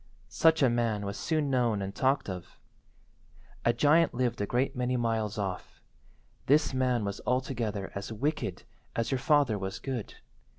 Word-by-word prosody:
Such 160 -2 +4
a - - +6
man 115 -3 0
was 100 +1 -4
soon 150 +6 0
known 120 -5 +2
and 100 0 -4
talked 135 +5 +1
of. 90 -3 -7 1.1
A 120 - +4
giant 150 +4 +3
lived 125 -3 0
a 100 - -1
great 130 +5 0
many 125 0 0
miles 110 -3 -1
off. 95 -3 -4 0.7
This 145 +1 +4
man 125 -4 +1
was 100 0 -4
altogether 120 -6 -1
as 100 +2 -5
wicked 115 - -2 0.3
as 115 0 -1
your 135 - +1
father 135 -6 +3
was 95 0 -4
good. 130 -6 -5
120 Hz, 160 wpm, -29 LUFS, 105-135 Hz, 1.1 s, a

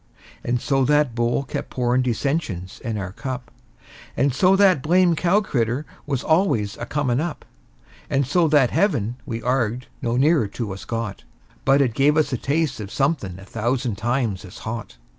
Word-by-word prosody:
And 120 0 0
so 135 +1 +1
that 150 -3 +3
bowl 120 +3 0
kept 135 - -5
pourin' 125 0 +1
dissensions 120 - -2
in 115 -4 -3
our 95 -2 -4
cup; 125 +2 -6 0.7
And 135 -1 +2
so 185 +8 +4
that 190 -7 +5
blamed 175 +2 +3
cow 180 +5 +3
critter 125 - -1 0.2
was 135 -3 -1
always 155 - +2
a 120 - -6
comin' 140 -2 0
up; 170 -1 -4 0.6
And 140 0 +1
so 165 +5 +2
that 145 -5 +4
heaven 135 - +1
we 115 -1 -4
arg'ed 125 -1 0 0.2
no 120 -1 0
nearer 145 -3 +3
to 110 -1 -5
us 95 - -9
got, 115 -4 -4 0.4
But 140 +1 +5
it 120 -4 -1
gave 145 +5 +3
us 155 -3 +2
a - - +1
taste 145 +1 -1
of 100 -2 -6
somethin' 135 - -1
a 95 - -12
thousand 120 0 -2
times 120 -5 -1
as 90 - -11
hot. 110 - -5
125 Hz, 180 wpm, -22 LUFS, 115-150 Hz, 0.7 s, that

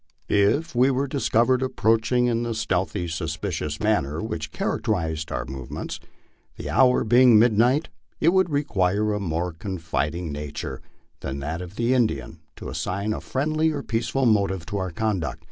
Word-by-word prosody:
If 105 +12 +2
we 125 +2 +4
were 135 +1 +1
discovered 130 -2 +2
approaching 125 -1 +2
in 120 -1 +1
the 120 -1 -2
stealthy, 90 -4 -1
suspicious 80 -1 -3
manner 85 -9 0
which 85 -9 -4
characterized 80 -2 -2
our - - -2
movements, 65 -1 -6 0.6
the - - -5
hour 125 +1 +4
being 120 +1 +6
mid 110 0 +5
night, 125 +8 +3 0.3
it 165 - +4
would 190 0 +3
require 105 - +1
a 105 - -1
more 85 -2 -2
confiding 80 -2 -3
nature 75 0 -5 0.4
than 65 0 -4
that 80 +5 -3
of 90 +2 -9
the 120 +3 +1
Indian 110 - 0 0.2
to - - -8
assign 100 +3 -2
a - - -5
friendly 155 +4 0
or 145 -3 -3
peaceful 115 +3 -1
motive 100 -6 +2
to 100 +2 -4
our 95 -1 -2
conduct. 95 -3 -2
105 Hz, 160 wpm, -24 LUFS, 85-125 Hz, 0.6 s, being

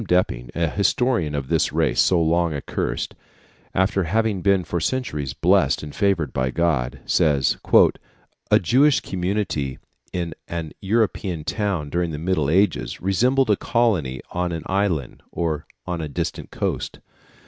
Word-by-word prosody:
Depping, 60 -10 +1
an 85 -2 0
historian 100 - +1
of 70 -2 -3
this - - +1
race - - +2
so 90 - +3
long 85 0 +1
accursed, 70 - -3 0.6
after 95 0 +2
having 105 +2 0
been 100 0 +3
for 85 - -2
centuries 75 - -2
blessed 85 -2 +3
and 75 - -7
favoured 95 -8 +1
by 65 0 0
God, 70 -5 0
says, 70 -3 +2 0.9
"A - - +6
Jewish 135 - +4
community 90 -8 -2 0.3
in 85 -2 -3
an 85 -2 -4
European 100 -5 0
town 95 -6 -2
during 85 0 0
the 75 - -4
Middle 80 -3 0
Ages 95 +6 +1
resembled 125 +6 +2
a - - +5
colony 95 - 0
on 90 0 -1
an 80 -2 -4
island 95 -9 -1
or 80 -3 -2 0.2
on 90 -2 -3
a 75 - -4
distant - - -4
coast. - - -3
85 Hz, 145 wpm, -23 LUFS, 75-100 Hz, 0.9 s, A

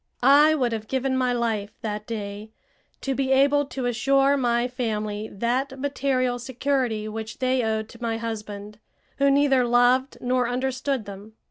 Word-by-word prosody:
I 295 +4 +6
would 250 -5 0
have 220 -1 -4
given 265 +1 -1
my 255 -1 +1
life, 225 -4 -2
that 210 -1 -4
day, 210 -1 -5 0.5
to 270 - -1
be 265 0 -1
able 280 +1 +4
to 265 -2 -4
assure 270 +4 +3
my 240 -2 +1
family 215 -4 -3
that 255 +6 -2
material 260 -3 0
security 250 -3 -1
which 220 0 -6
they 255 0 +1
owed 220 -1 -1
to 230 - -14
my 230 -1 -1
husband, 210 -2 -6 0.4
who 280 0 +3
neither 275 -2 +4
loved 245 +2 +3
nor 250 -1 0
understood 260 -1 -2
them. 200 +2 -10
245 Hz, 155 wpm, -24 LUFS, 220-265 Hz, 0.5 s, I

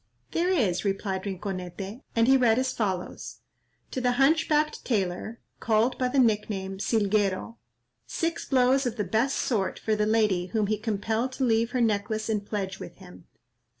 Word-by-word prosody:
"There 345 +2 +1
is," 205 - +1
replied 195 -1 -2
Rinconete, 190 +3 -5
and 230 0 +3
he 265 - +6
read 240 -4 +4
as 260 0 0
follows:— 190 -5 -4 0.5
"To 260 - -3
the 250 0 +2
hunch 285 +6 +3
backed 305 0 +1
Tailor, 210 0 -2 0.2
called 225 +3 +1
by 255 - +2
the 260 +2 -2
nick 220 -5 +3
name 190 -2 -4
Silguero, 210 0 0 0.5
six 330 0 -2
blows 260 0 +3
of 235 - -3
the 210 - -1
best 225 +8 0
sort 205 -7 -1
for 220 - 0
the 210 0 +1
lady 210 -5 +2
whom 215 +2 0
he 210 0 -1
compelled 220 +3 -1
to 265 - -2
leave 230 -1 +2
her 250 0 -1
necklace 215 0 0
in 215 -2 0
pledge 200 -2 -4
with 170 - -9
him. 180 -2 -15
220 Hz, 175 wpm, -27 LUFS, 195-250 Hz, 0.5 s, he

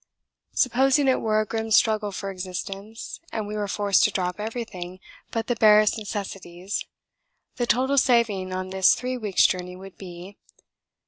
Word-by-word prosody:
Supposing 270 +2 +3
it 260 - +3
were 215 -1 +2
a - - -2
grim 225 +1 -3
struggle 215 -1 +3
for 195 0 -5
existence 195 +3 -6
and 220 -2 -3
we 210 +1 -5
were 210 -1 -2
forced 200 -1 +2
to - - +3
drop 180 -1 -2
everything 210 -5 -6 0.3
but 225 -1 -2
the 245 - 0
barest 215 -1 +5
necessities, 195 -3 -5 0.7
the 240 -2 -1
total 265 +5 +3
saving 225 -7 +2
on 185 0 -3
this 190 -1 +5
three 255 0 -3
weeks' 210 -6 +2
journey 180 0 -1
would 190 +1 -12
be: 180 +1 -10 0.2
lbs. - - -33
210 Hz, 165 wpm, -25 LUFS, 185-225 Hz, 0.7 s, barest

